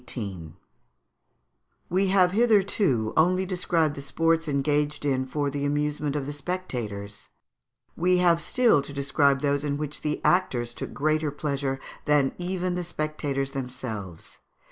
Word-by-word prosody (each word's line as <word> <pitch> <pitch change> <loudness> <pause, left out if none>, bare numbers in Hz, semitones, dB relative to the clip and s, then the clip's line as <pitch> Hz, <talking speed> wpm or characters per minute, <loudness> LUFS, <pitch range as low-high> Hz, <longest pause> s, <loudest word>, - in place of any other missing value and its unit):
] 80 - -12
We 190 +3 +1
have 185 -2 +4
hitherto 200 - +2
only 185 +4 +3
described 175 -4 +1
the 140 - -7
sports 165 +4 +1
engaged 145 +1 0
in 130 -2 0
for 145 +1 -1
the 140 0 -3
amusement 145 0 -1
of 145 -2 -2
the 145 - -4
spectators; 120 - -5 0.7
we 180 +2 +3
have 170 -2 +4
still 235 - +3
to 140 +1 -9
describe 140 0 +2
those 145 -1 +1
in 145 -1 -1
which 150 0 -5
the 150 0 -1
actors 125 -10 +2
took - - -6
greater 155 +1 0
pleasure 140 -2 -2 0.3
than 145 -3 +3
even 180 0 -1
the 180 0 -2
spectators 150 -4 -3
themselves. 115 - -6
145 Hz, 140 wpm, -26 LUFS, 135-170 Hz, 0.7 s, have